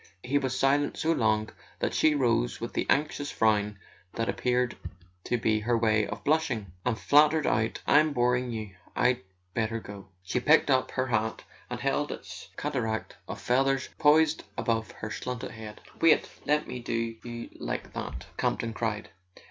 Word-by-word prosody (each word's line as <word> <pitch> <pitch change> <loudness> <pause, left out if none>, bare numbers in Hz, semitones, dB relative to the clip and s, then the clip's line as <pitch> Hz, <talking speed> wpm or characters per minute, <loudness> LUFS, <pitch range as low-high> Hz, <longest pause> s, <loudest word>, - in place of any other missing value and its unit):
He 140 +3 +1
was 130 -2 -2
silent 145 +2 +2
so 160 - +1
long 110 -6 +1 0.3
that - - -1
she 155 -1 +4
rose 120 -3 +1
with 115 0 -5
the - - -1
anxious 145 0 +1
frown 105 -2 +2 0.4
that 115 - -1
appeared 125 -1 +1 0.5
to 120 - +1
be 110 -1 +1
her 115 +2 +1
way 110 -2 +2
of - - -6
blushing, 130 - 0
and 120 -3 0
faltered 150 - +4
out: 110 +1 0
"I'm 155 +1 +5
boring 125 -1 +1
you—I'd 110 +3 -1 0.3
better 115 0 -1
go." 100 -2 -10 0.2
She 95 +7 -1
picked 150 +2 +4
up 130 -1 +3
her 130 - -1
hat 110 -3 -1 0.3
and 125 0 -4
held 140 +3 0
its 95 0 -8
cataract 115 -7 -2
of - - -6
feathers 135 +1 +1
poised 155 +1 +4
above 115 -2 0
her 110 - -7
slanted 125 +2 -4
head. 110 -1 -9 0.2
"Wait—let 150 -2 +2
me 125 - -5
do 115 -1 -2
you 120 -1 -6
like - - -4
that!" - - -5
Campton 115 -1 -1
cried. 110 -2 -2
120 Hz, 160 wpm, -28 LUFS, 110-135 Hz, 0.5 s, I'm